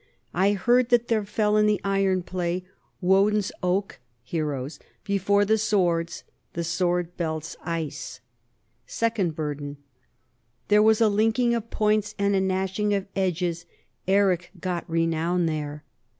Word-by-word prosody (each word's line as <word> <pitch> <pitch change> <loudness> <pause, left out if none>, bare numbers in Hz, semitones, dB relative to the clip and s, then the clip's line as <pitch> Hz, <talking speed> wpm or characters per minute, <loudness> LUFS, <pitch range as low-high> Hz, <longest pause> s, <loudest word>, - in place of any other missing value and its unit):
I 195 +3 +3
heard 240 +5 +3
that 240 -1 +3
there 220 -2 +2
fell 210 +1 +1
in 210 0 +4
the 210 -2 +2
iron 195 -2 +1
play 180 0 -2 0.4
Woden's 195 +2 +3
oak 185 -1 -1 0.2
[heroes] 145 -1 -3 0.2
before 200 0 +2
the 220 +2 +2
swords 175 -5 0 0.3
[the 170 - -2
sword 175 0 -1
belt's 160 -2 -3
ice]. 165 -4 -4 0.7
Second 220 -8 -1
Burden: 145 -2 -4 0.9
There 210 0 +6
was 220 +1 +4
a 225 - +6
linking 225 +4 +2
of 230 -1 -3
points 215 0 +1
and 200 0 +1
a 190 - +2
gnash 190 +1 -1
ing 210 -1 +2
of 195 -1 -2
edges: 175 -2 -1 0.4
Eric 190 -3 +2
got 175 -2 -3
renown 165 +1 +1
there. 150 -2 -3
190 Hz, 135 wpm, -25 LUFS, 170-210 Hz, 0.9 s, There